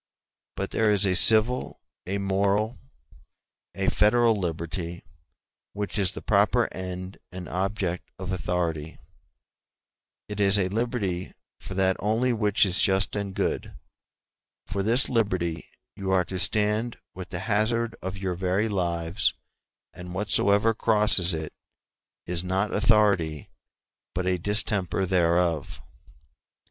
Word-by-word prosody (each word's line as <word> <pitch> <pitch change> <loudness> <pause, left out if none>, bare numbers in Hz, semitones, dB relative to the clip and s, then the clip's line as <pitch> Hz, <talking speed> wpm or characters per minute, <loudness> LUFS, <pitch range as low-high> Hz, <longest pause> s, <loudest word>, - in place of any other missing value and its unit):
But - - -4
there 110 -1 +2
is 105 -1 +3
a 95 -1 +2
civil, 115 +6 +3 0.3
a 100 +2 -1
moral, 100 +2 0 1.0
a - - -2
federal 115 +2 +4
liberty 85 -1 -4 0.7
which 105 +1 -3
is 95 -3 +2
the - - -8
proper - - +3
end 95 0 -6
and 90 -1 -7
object 95 -1 -2
of 95 0 -5
authority; 85 -2 -2 1.3
it 105 -1 -6
is 100 0 +5
a 95 -2 +1
liberty 105 -5 -2 0.2
for 95 - -8
that 95 0 +2
only 115 +4 +1
which 105 -2 +3
is 95 -1 0
just 95 +1 +1
and 100 -2 -4
good: - - -2 0.9
for 100 - -3
this 115 +6 +3
liberty 90 -8 -1 0.3
you 95 -1 -5
are 95 -2 +2
to 95 +2 -5
stand 105 +4 +1 0.2
with 95 -1 -8
the 90 0 -4
hazard 115 +2 0
of 95 +1 -5
your 95 -1 -2
very 95 +4 0
lives 85 -2 0 0.6
and 90 0 -9
whatsoever 105 +2 +2
crosses 105 -6 +3
it 80 -1 -6 0.7
is 90 0 +1
not 95 +3 -1
authority, 100 - +2 0.6
but 90 0 -1
a 90 -1 0
distemper 100 -1 +1
thereof. 85 -3 +1
95 Hz, 125 wpm, -26 LUFS, 90-105 Hz, 1.3 s, is